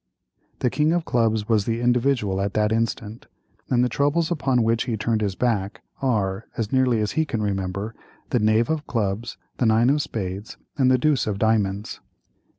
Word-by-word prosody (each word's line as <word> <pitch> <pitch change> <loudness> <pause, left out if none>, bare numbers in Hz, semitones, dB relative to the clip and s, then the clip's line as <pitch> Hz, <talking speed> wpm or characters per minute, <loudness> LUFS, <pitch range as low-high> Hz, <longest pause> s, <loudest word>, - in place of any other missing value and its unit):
The 125 - +1
king 150 +2 +2
of 175 -1 0
clubs 110 -3 +1
was 110 -4 +2
the 115 0 -1
Individual 120 -5 +1
at 100 0 -2
that 105 0 +2
instant, 115 -1 -2 0.4
and 125 -1 +3
the - - +3
troubles 145 +7 +1
upon 135 -7 +1
which 115 +1 +1
he 115 -3 -2
turned 110 +1 0
his 100 -3 -1
back 115 -1 -1 0.2
are, 105 -6 0
as 110 -2 -2
nearly 130 -4 +2
as 105 - -1
he 160 - +1
can 115 -8 -3
remember, 100 +1 -2 0.4
the 125 - +2
knave 110 +2 +3
of 155 -2 -2
clubs, 110 0 -2 0.2
the 120 - +2
nine 115 +4 +4
of 145 +1 +2
spades, 100 -4 -5 0.2
and 130 -3 +3
the 130 - +5
deuce 145 -2 +1
of 105 -2 -1
diamonds. 105 -2 0
115 Hz, 185 wpm, -23 LUFS, 105-125 Hz, 0.4 s, the